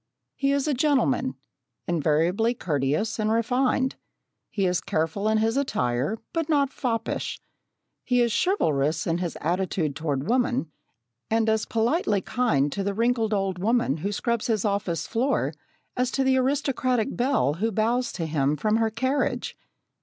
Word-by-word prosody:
He 275 0 +1
is 280 +1 +1
a 300 - +2
gentleman, 255 - +1 0.5
invariably 175 - +1
courteous 150 - -1
and 215 0 +1
refined. 255 +3 +1 0.5
He 200 -3 -1
is 180 -1 +1
careful 165 +6 -1
in 220 0 +3
his 225 +3 +1
attire, 135 - 0 0.2
but 330 -2 -1
not 280 -3 +2
foppish. 230 -4 -2 0.6
He 250 -1 +1
is 240 -1 +3
chivalrous 155 - +1
in 170 +1 0
his 175 -3 -3
attitude 170 -3 -1
toward 145 -3 -2
woman, 245 -8 +1 0.6
and 225 0 +2
as 220 -1 +1
politely 230 - +1
kind 160 - +1
to 200 - -2
the 200 0 -2
wrinkled 230 -1 +1
old 195 -3 -1
woman 215 - +1
who 195 +6 -3
scrubs 235 +2 -1
his 220 -3 0
office 200 -5 -1
floor 245 +5 0 0.4
as 250 0 +1
to 270 - 0
the 265 0 +3
aristocratic 255 -3 0
belle 240 - +2
who 225 +1 +1
bows 235 +4 0
to 165 - -3
him 150 -2 +1
from 215 +4 +1
her 225 -1 +2
carriage. 260 +6 -1
220 Hz, 155 wpm, -25 LUFS, 170-250 Hz, 0.6 s, in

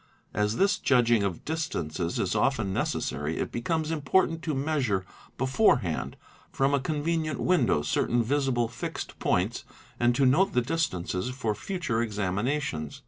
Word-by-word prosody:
As 105 +1 0
this 200 +6 +2
judging 120 -4 +3
of 95 -4 -3
distances 90 - -2
is - - 0
often 110 -3 +1
necessary, 75 -2 -2
it - - -2
becomes 155 +6 -1
important 165 +2 +1
to 155 -4 -2
measure 135 -10 0 0.3
before 130 - +4
hand 70 -5 -3 0.3
from 135 +1 +1
a 140 - +3
convenient 155 +2 -1
window 125 - +2
certain 120 +9 +1
visible 130 -2 +1
fixed 120 - -6
points - - 0 0.4
and 120 0 +3
to 135 - +3
note 160 +10 +4
the 125 - +3
distances 120 - -1
for 125 -4 -2
future 150 - -2
examinations. 105 - -2
125 Hz, 140 wpm, -27 LUFS, 105-155 Hz, 0.4 s, before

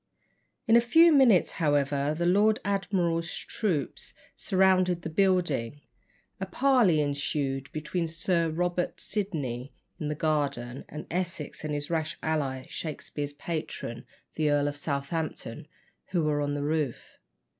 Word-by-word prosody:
In 225 - +5
a 235 - +7
few 325 +8 +6
minutes, 250 -10 +5
however, 145 -1 +1
the 170 - 0
Lord 210 +5 +4
Admiral's 180 -4 0
troops 170 - -3 0.2
surrounded 185 -2 +2
the 160 - -4
building. 155 - +1 0.6
A 190 - -3
parley 235 - +3
ensued 140 -2 -1
between 155 +3 -2
Sir 165 +1 0
Robert 175 +2 -1
Sidney 145 - -3 0.2
in 155 - -3
the 150 - -2
garden, 140 -5 -1
and 150 - -7
Essex 170 -4 -3
and 150 -1 -2
his 145 +2 -4
rash 160 -2 -1
ally, 135 -5 -1
Shakspere's 145 -2 -5
patron, 145 -6 -5 0.3
the 155 -1 +1
Earl 145 0 +2
of 145 - -2
Southampton, 145 -2 -3 0.4
who 175 -3 0
were 150 -1 +1
on 145 0 -1
the 145 - -2
roof. 150 -4 -2
155 Hz, 135 wpm, -28 LUFS, 145-180 Hz, 0.6 s, a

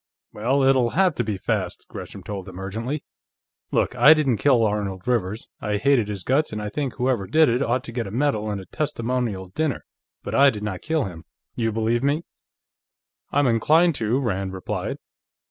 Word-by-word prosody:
"Well, 130 +6 +1
it'll 130 -3 +4
have 185 -3 +4
to 120 - -1
be 105 -3 -2
fast," - - -2
Gresham 100 - -9
told 95 0 -6
him 90 0 -9
urgently. 115 +10 -4 0.7
"Look. - - +1
I 130 +6 +8
didn't 135 -7 +1
kill 120 0 +4
Arnold 100 -2 -2
Rivers. 110 -3 -1
I 105 -1 -1
hated 130 -1 +3
his 100 -3 -5
guts, 145 +4 +1
and 105 - -4
I 105 0 -3
think 135 +3 -3
whoever 125 -6 0
did 155 -2 +4
it 120 +3 +1
ought 125 -1 0
to 120 - -8
get 115 -2 -3
a - - -5
medal 110 -2 0
and 100 -1 -2
a 95 - -9
testimonial 120 - -2
dinner, 155 -1 -1 0.4
but - - -5
I 140 0 +6
did 105 -5 -5
not 100 -4 -4
kill 160 -1 0
him. 85 -5 -7 0.3
You 115 -1 0
believe 115 +2 0
me?" 145 +4 +1 1.1
"I'm 145 0 +3
inclined 155 +9 +4
to," 115 +4 +1
Rand 95 -7 -2
replied. 95 - -4
115 Hz, 190 wpm, -23 LUFS, 105-140 Hz, 1.1 s, I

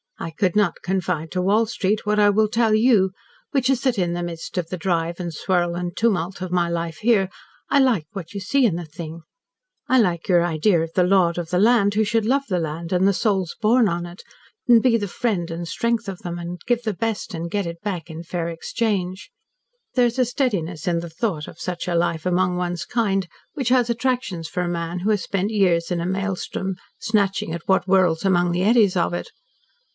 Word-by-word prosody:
I - - -4
could 180 +2 0
not 205 -5 +1
confide 180 -4 -2
to 180 - -1
Wall 205 +5 +3
Street 215 -1 -1
what 210 0 +2
I 205 0 +6
will 215 +1 +3
tell 225 0 +2
you 215 -4 +4 0.4
which 265 -2 +1
is 265 - 0
that 255 -4 +1
in 175 -2 0
the 175 0 -3
midst 170 -1 -6
of 170 -2 -1
the 185 - -4
drive 170 0 -1
and 175 -2 -4
swirl 175 +1 0
and 175 0 -4
tumult 195 -5 0
of 185 -1 -4
my 175 -1 +1
life 170 -1 -3
here, 210 -5 +2 0.4
I 280 - +4
like 245 - +3
what 195 -4 -8
you 200 - -4
see 245 +7 +2
in 195 -8 +2
the 175 0 -5
thing, 160 +1 -8 0.7
I 260 - +4
like 175 -7 +1
your 175 -2 +4
idea 170 +1 +2
of 165 0 -4
the 180 - +3
lord 180 -2 +3
of 170 -2 -5
the 180 +1 +1
land, 205 -2 +4
who 220 - +3
should 220 0 +1
love 275 +4 +2
the 180 -2 +1
land 165 +1 -4
and 185 +1 +3
the 200 - +4
souls 190 -4 0
born 225 +2 +4
on 175 -1 -2
it, 175 +1 -11 0.4
and 235 -2 +7
be 250 -1 +3
the 205 -3 0
friend 195 -5 -1
and 170 +1 -5
strength 235 +4 -1
of 190 -2 -5
them 175 -1 -5
and 175 +1 -6
give 240 0 +1
the 215 -3 -1
best 220 +2 -3
and 165 +1 -4
get 200 +1 -1
it 170 0 -7
back 180 -6 -4
in 160 +1 -7
fair 170 0 -3
exchange. 190 - -2 0.6
There's 245 0 +2
a 255 - +4
steadiness 195 - -2
in 170 -1 +2
the 170 0 -6
thought 165 -3 -2
of - - -12
such 180 -1 -4
a 175 - 0
life 170 -1 0
among 180 0 +1
one's 175 -1 -2
kind 195 -6 0 0.3
which 265 -4 -1
has 250 -2 +3
attractions 235 -8 -1
for 180 +2 -3
a 175 - -1
man 170 0 -3
who 200 +5 0
has 205 -3 +1
spent 200 +2 -1
years 180 -6 +2
in 175 - 0
a 170 - -2
maelstrom, 190 0 -2 0.2
snatching 200 -6 0
at 170 -1 -6
what 190 -2 +3
whirls 185 -3 +3
among 175 -2 +3
the 175 +1 0
eddies 215 -3 +4
of 170 0 +1
it. - - -5
185 Hz, 225 wpm, -22 LUFS, 170-215 Hz, 0.7 s, and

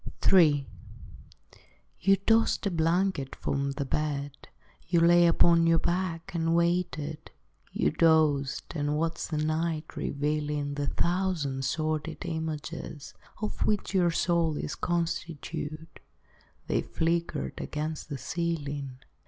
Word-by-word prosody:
III 150 -7 +6 1.3
You 195 +2 +5
tossed 225 +3 +2
a 200 - +1
blanket 165 -3 0
from 140 0 -2
the 140 0 -3
bed, 145 0 -2 0.5
You 170 +1 +3
lay 175 +1 +6
upon 170 0 +5
your 165 0 +5
back, 170 -1 -2
and 165 -1 +1
waited; 170 -3 -1 0.4
You 75 - +1
dozed, 155 -4 +2
and 145 -1 0
watched 165 +1 -2
the 155 - -2
night 155 +1 -1
revealing 145 0 -1
The 145 0 -2
thousand 170 -7 0
sordid 155 +4 -2
images 160 -2 -5 0.3
Of 215 - -1
which 210 -1 0
your 180 -3 +4
soul 170 -1 +1
was 145 - -3
constituted; 165 -2 -3 0.7
They - - +1
flickered 165 - -2
against 155 +1 -4
the 145 - -4
ceiling. 145 -2 -3
160 Hz, 115 wpm, -28 LUFS, 145-170 Hz, 1.3 s, III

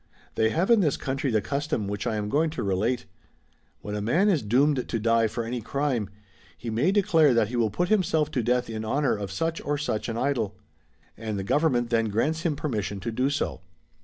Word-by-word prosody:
"' - - -30
They 110 0 +2
have 175 - +1
in 230 - +6
this 155 -8 +2
country 135 +1 -2
the 110 -3 +2
custom 140 -3 -2
which 100 0 -3
I 110 - 0
am 105 -1 -2
going 155 +8 +2
to - - -1
relate. 105 +6 0 0.8
When 105 - -6
a 105 - -2
man 165 - +2
is 175 -7 +2
doomed 130 +5 +2
to 115 - 0
die 115 +1 +3
for 115 +2 -3
any 120 +1 -3
crime, 125 -4 -1 0.5
he 115 +4 -5
may 130 +12 +2
declare 165 - +4
that 110 -2 +2
he 125 - -4
will 115 -2 +2
put 175 - -1
himself 160 -7 +2
to 130 - 0
death 125 +2 +1
in 110 -1 -4
honour 140 +6 +1
of 100 -2 -5
such 165 - -2
or 145 0 -1
such 125 -7 -2
an 115 - -3
idol; 120 -6 -1 0.6
and 110 -2 -4
the 95 - -3
government 120 0 +1
then 115 -1 +2
grants 135 +10 0
him 165 -3 0
permission 105 -9 -3
to 115 - -4
do 125 +4 +1
so. 145 - -2
120 Hz, 220 wpm, -26 LUFS, 110-150 Hz, 0.8 s, in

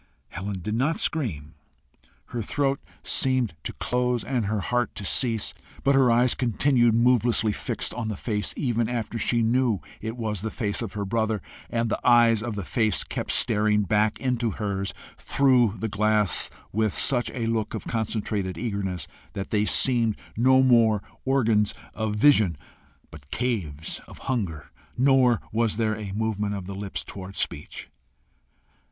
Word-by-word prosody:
Helen 100 -1 -5
did 105 - -2
not 135 +8 +1
scream 85 - -1 0.8
her 120 - -3
throat 135 +5 0 0.2
seemed 130 - +2
to - - -4
close 125 -1 -1
and 125 -6 -1
her 105 0 0
heart 120 +1 -1
to 100 - -6
cease. 115 +1 +1 0.3
But 140 - +4
her 135 -2 +5
eyes 120 +1 +4
continued 120 -1 +2
movelessly 120 -2 +3
fixed - - -3
on 120 -2 -4
the 105 -3 -3
face 105 -3 -2
even 120 -4 0
after 115 -1 -3
she 115 +2 +2
knew 120 -2 +2 0.2
it 110 +2 -5
was 105 -5 -3
the 110 - -2
face 105 -2 -2
of 115 -5 -5
her 100 -2 -3
brother, 110 +1 0 0.3
and 115 -1 0
the - - -1
eyes 120 -2 +5
of 115 -2 -4
the 100 -3 -4
face 110 -3 +1
kept - - -5
staring 105 -1 +3
back 105 +2 +1
into 125 -3 0
hers 100 -2 -2 0.3
through 125 -6 +3
the 110 - -2
glass 105 -1 +1 0.2
with 110 -1 0
such 125 -3 +2
a 120 -3 -2
look 115 -1 -1
of 110 - -6
concentrated 105 -4 -2
eagerness 100 - -3 0.3
that 95 -1 -5
they 105 -1 +2
seemed 115 +1 +2 0.2
no 130 +3 +5
more 115 -5 +4 0.2
organs 115 -6 +2 0.2
of 110 -1 -2
vision, 105 - +4 0.5
but 70 -2 -13
caves 90 - -2
of - - -12
hunger, 80 - -3 0.3
nor 130 -2 +4
was 110 -1 0
there 110 -2 +1
a 105 -2 -6
movement 105 -1 -1
of 95 -2 -6
the 100 - -6
lips 95 -6 -4
towards 95 +2 -9
speech. - - -4
110 Hz, 160 wpm, -25 LUFS, 105-120 Hz, 0.8 s, her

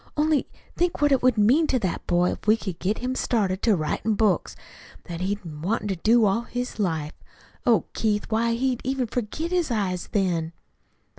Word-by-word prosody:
"Only 300 -1 +2 0.3
think 350 0 0
what 290 0 +3
it 270 - +4
would 250 -2 +3
mean 255 +10 +4
to 265 - +2
that 190 -7 -3
boy 175 0 +2
if - - -8
we 215 +1 +5
could 190 -6 -6
get 205 +4 0
him 250 +1 -2
started 200 -7 0
to 220 -3 +3
writin' 190 +7 -1
books 205 -5 +1 0.5
what 170 0 -6
he's 200 +2 0
wanted 170 +7 -3
to 195 - 0
do 225 +5 +4
all 200 +3 +2
his 245 0 -5
life. 160 -6 -1 0.5
Oh, 235 -2 +4
Keith, 210 -2 0
why, 230 +1 +1
he'd 250 +1 0
even 265 0 -1
forget 245 - -3
his 355 -4 +1
eyes 195 -6 -2
then." 170 -5 0
220 Hz, 190 wpm, -25 LUFS, 185-250 Hz, 0.5 s, we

